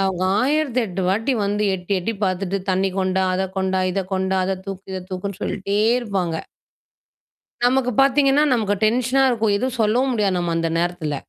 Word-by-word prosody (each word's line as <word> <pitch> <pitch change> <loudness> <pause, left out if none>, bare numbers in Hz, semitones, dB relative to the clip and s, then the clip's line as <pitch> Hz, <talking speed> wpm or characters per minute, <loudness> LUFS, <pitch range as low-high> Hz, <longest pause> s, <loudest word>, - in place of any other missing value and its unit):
அவங்க 185 -1 -1 0.2
1008 250 - 0
வாட்டி 225 +7 +1
வந்து 205 +1 0
எட்டி, 180 +2 -5
எட்டி 205 +6 -2
பாத்துட்டு, 190 0 0
தண்ணி 190 +1 +1
கொண்டா, 190 0 +1
அத 190 - 0
கொண்டா, 190 0 0
இத 195 - -1
கொண்டா, 190 0 0
அத 190 0 -1
தூக்கு, 195 -1 -7
இத 185 - -4
தூக்குன்னு 190 +1 -5
சொல்லிட்டே 200 +1 -2 0.2
இருப்பாங்க. 195 -8 -2 1.3
நமக்கு 250 0 +2
பாத்தீங்கன்னா, 275 +1 +4
நமக்கு 210 -4 +1
டென்ஷனா 250 +4 +2
இருக்கும். 220 -3 +1
எதுவும் 255 +2 -2
சொல்லவும் 245 +5 +2
முடியாது, 200 -5 +1
நம்ம 175 -1 -1
அந்த 165 0 0
நேரத்துல. 170 -3 -2
200 Hz, 160 wpm, -21 LUFS, 185-240 Hz, 1.3 s, பாத்தீங்கன்னா